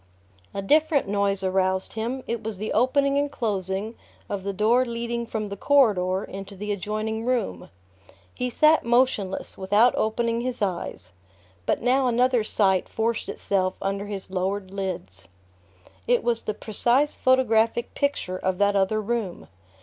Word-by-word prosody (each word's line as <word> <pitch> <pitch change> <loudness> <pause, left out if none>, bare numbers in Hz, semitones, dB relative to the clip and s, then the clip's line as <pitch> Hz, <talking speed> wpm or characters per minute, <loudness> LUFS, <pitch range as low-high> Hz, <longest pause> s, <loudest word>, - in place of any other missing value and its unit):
A 195 - -4
different 305 +4 +3
noise 200 -1 0
aroused 190 0 0
him. 240 +4 -3
It 235 -1 -3
was 220 -2 -5
the 215 +3 -3
opening 275 +4 +3
and 285 0 -1
closing 200 -1 -2 0.4
of 200 - -3
the 200 +1 -3
door 220 +6 +3
leading 235 -1 -3
from 215 -2 -3
the 200 - -5
corridor 200 -7 +3
into 195 +1 -8
the 210 +2 -4
adjoining 215 +2 -3
room. 230 - -2 0.6
He 250 - -2
sat 305 +6 +4
motionless, 235 -7 0
without 205 +6 +4
opening 230 +1 0
his 250 0 -3
eyes; 175 - -3 0.6
but - - 0
now 255 +2 +3
another 245 -1 +2
sight 190 -3 +1
forced 225 0 -1
itself 185 -2 -1
under 195 +1 -2
his 195 -2 -6
lowered 190 +1 -2
lids. 180 - -5 0.8
It 245 0 +3
was 235 -1 +1
the 215 - -3
precise 240 +8 +1
photographic 235 -2 +2
picture 280 -10 -1
of 185 -1 -1
that 205 +1 +2
other 195 +2 +2
room. 215 -4 -3
215 Hz, 150 wpm, -25 LUFS, 195-240 Hz, 0.8 s, sat